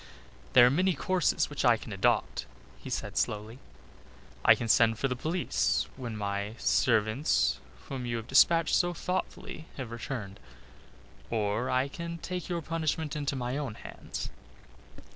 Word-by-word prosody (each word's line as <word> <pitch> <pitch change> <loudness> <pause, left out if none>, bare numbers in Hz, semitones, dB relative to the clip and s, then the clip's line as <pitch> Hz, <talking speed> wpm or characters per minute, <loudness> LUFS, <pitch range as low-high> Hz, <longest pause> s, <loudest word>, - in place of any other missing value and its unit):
"There 120 - +9
are 125 - +5
many 180 +4 +2
courses 185 +5 +1
which 145 - -4
I 120 -3 +5
can 110 - -8
adopt," 65 -10 +1 0.3
he - - -8
said - - -3
slowly. 110 +4 -2 0.8
"I - - +8
can 115 - -4
send 115 -1 +4
for 135 - 0
the 125 - -2
police 125 - 0
when 120 -4 -5
my 100 +1 -3
servants 110 +6 +2 0.3
whom 130 -3 -4
you 120 -1 -1
have 115 - -6
despatched 165 +4 +5
so 175 0 +2
thoughtfully 180 -3 -4
have 130 -4 -5
returned, 110 -4 -5 0.9
or 110 +1 0
I 130 +2 +2
can 170 +3 -6
take 180 +1 -5
your 170 -2 -2
punishment 160 -1 -2
into 145 -1 -1
my 125 +1 -2
own 135 -7 -4
hands." - - -7
130 Hz, 150 wpm, -29 LUFS, 110-160 Hz, 0.9 s, There